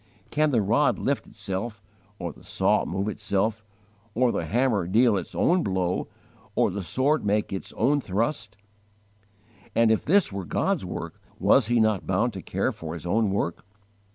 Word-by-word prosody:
Can 155 0 +2
the 120 -7 +2
rod - - +2
lift - - -1
itself, 100 +3 -5 0.4
or 85 -5 -5
the - - -18
saw - - +1
move 95 +3 -2
itself, 105 0 -1 0.5
or 125 +1 +3
the - - -2
hammer 115 -7 +1
deal 115 +3 +4
its 95 - -4
own 180 +1 +3
blow, 95 - -1 0.5
or - - +3
the 100 +2 -4
sword 135 - +1
make 105 0 0
its 95 - -5
own 140 +5 +2
thrust? 115 +1 -2 1.2
And 115 -1 +4
if 110 - +2
this 195 - +3
were 100 -1 -4
God's - - 0
work, - - -6 0.2
was 135 -6 +4
He 120 0 +2
not 110 -3 +1
bound 110 +5 +1
to 95 - -6
care - - -1
for 80 0 -7
His 85 - -8
own 105 +4 +2
work? 95 -4 -2
110 Hz, 170 wpm, -26 LUFS, 95-120 Hz, 1.2 s, deal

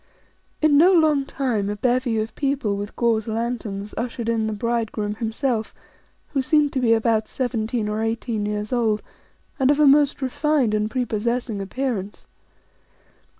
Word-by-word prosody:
In 290 -2 +5
no 355 +4 +7
long 305 -5 +3
time, 230 -7 -1
a 205 - -2
bevy 245 +1 +1
of 220 +1 -2
people 275 -7 -1
with 205 +1 -6
gauze 230 -2 +1
lanterns 220 -3 -3
ushered 235 0 -3
in 225 -1 0
the - - -2
bridegroom 220 -1 -2
himself, 225 +1 -2 0.5
who 275 - 0
seemed 295 +1 +2
to 265 - 0
be 235 -3 +3
about 220 -1 +1
seventeen 230 -3 -2
or 210 +1 -2
eighteen 225 -1 -2
years 210 +2 -3
old, 225 -3 +1 0.6
and 265 0 +3
of 290 +1 +3
a 300 - +6
most 285 0 +4
refined 285 -3 +1
and 215 0 0
prepossessing 235 -2 -2
appearance. 210 -1 -4
230 Hz, 150 wpm, -23 LUFS, 215-265 Hz, 0.6 s, no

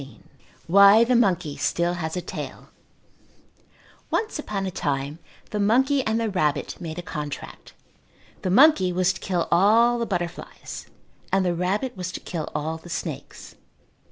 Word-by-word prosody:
XIV 135 0 -12 0.5
Why 200 +5 +7
the 245 +2 +2
Monkey 180 -10 +1
Still 170 +4 0
Has 160 -1 -4
a - - -1
Tail - - -7 1.4
Once 440 -7 -1
upon 200 -9 -3
a 190 - -3
time 145 -1 -3 0.3
the 210 - -2
monkey 260 +7 +3
and 220 +1 +1
the 230 - 0
rabbit 155 -8 -1
made 160 -1 -6
a 175 - -5
contract. 150 -4 -7 0.7
The 185 - -2
monkey 195 - +5
was 185 +1 +2
to - - -9
kill 180 -3 -1
all 225 +7 +4
the 235 - -2
butterflies 175 -1 -5 0.4
and 195 -1 +2
the 175 - +1
rabbit 195 +9 -1
was 185 -1 -4
to - - -5
kill 160 -3 -5
all 155 +2 -2
the 175 - -13
snakes. - - -6
185 Hz, 155 wpm, -24 LUFS, 170-220 Hz, 1.4 s, Why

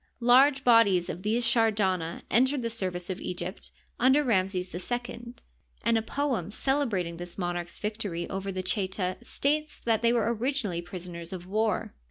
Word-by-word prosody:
Large 265 +3 +5
bodies 205 -7 +5
of 175 - -5
these 225 +4 +1
Shardana 205 -7 +1
entered 260 +2 +3
the 230 - -2
service 185 -4 -2
of 185 - -5
Egypt 180 +2 -5 0.3
under 265 +4 +5
Ram 195 -8 +2
ses 185 -1 -4
II, 240 +4 -5 0.5
and 230 0 +3
a 225 - +3
poem 250 - -2
celebrating 210 -9 -1
this 175 0 -7
monarch's 175 -2 -3
victory 210 -5 -3
over 195 +1 -4
the 185 -1 -4
Cheta 185 -1 -1
states 300 +2 -1
that 225 -2 +1
they 235 0 +4
were 235 -1 +2
originally 230 -7 -1
prisoners 175 -2 -8
of 180 -2 -6
war. 215 +3 -1
210 Hz, 160 wpm, -28 LUFS, 180-240 Hz, 0.5 s, Large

